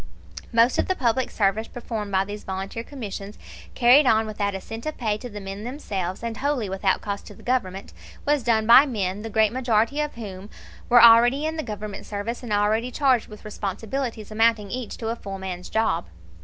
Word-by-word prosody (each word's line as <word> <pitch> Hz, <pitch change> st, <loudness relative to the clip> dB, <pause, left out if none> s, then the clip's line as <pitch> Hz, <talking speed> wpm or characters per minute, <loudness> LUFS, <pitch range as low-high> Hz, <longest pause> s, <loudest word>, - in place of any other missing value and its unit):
Most 230 Hz, +2 st, +4 dB
of -, -, +1 dB
the 375 Hz, -, +1 dB
public 255 Hz, -3 st, 0 dB
service 210 Hz, +2 st, 0 dB
performed 220 Hz, -4 st, -5 dB
by 190 Hz, 0 st, +2 dB
these 205 Hz, +1 st, -7 dB
volunteer 195 Hz, +4 st, -5 dB
commissions, 210 Hz, -6 st, -7 dB, 0.4 s
carried 255 Hz, +3 st, +6 dB
on 220 Hz, -1 st, +4 dB
without 205 Hz, -2 st, -2 dB
a -, -, -3 dB
cent 225 Hz, +7 st, -8 dB
of 310 Hz, -, -4 dB
pay 215 Hz, -4 st, 0 dB
to 245 Hz, -, -7 dB
the 210 Hz, -2 st, -7 dB
men 195 Hz, +1 st, -7 dB
themselves, 200 Hz, -, -4 dB
and 230 Hz, -1 st, -4 dB
wholly 275 Hz, -5 st, -1 dB
without 190 Hz, 0 st, 0 dB
cost 200 Hz, -1 st, -5 dB
to 205 Hz, -, -11 dB
the -, -, -16 dB
Government, 200 Hz, -7 st, -2 dB, 0.3 s
was 290 Hz, -1 st, +2 dB
done 225 Hz, -2 st, +2 dB
by 255 Hz, +6 st, +8 dB
men 200 Hz, -5 st, -2 dB
the 225 Hz, -, -6 dB
great 220 Hz, 0 st, +2 dB
majority 240 Hz, +1 st, +1 dB
of 300 Hz, 0 st, -3 dB
whom 200 Hz, -3 st, -8 dB, 0.4 s
were 240 Hz, -1 st, +7 dB
already 240 Hz, +5 st, +7 dB
in 315 Hz, +1 st, -2 dB
the 315 Hz, -, -2 dB
Government 210 Hz, -5 st, -7 dB
service 210 Hz, +3 st, -4 dB
and 240 Hz, -4 st, -7 dB
already 210 Hz, +4 st, +1 dB
charged 255 Hz, -3 st, +2 dB
with 210 Hz, 0 st, -13 dB
responsibilities 215 Hz, +3 st, -4 dB
amounting 220 Hz, -2 st, +2 dB
each 250 Hz, -3 st, -5 dB
to 225 Hz, -, -4 dB
a 230 Hz, -, -1 dB
full 195 Hz, -4 st, -7 dB
man's 185 Hz, -1 st, -6 dB
job. 220 Hz, -, 0 dB
220 Hz, 200 wpm, -24 LUFS, 200-245 Hz, 0.4 s, by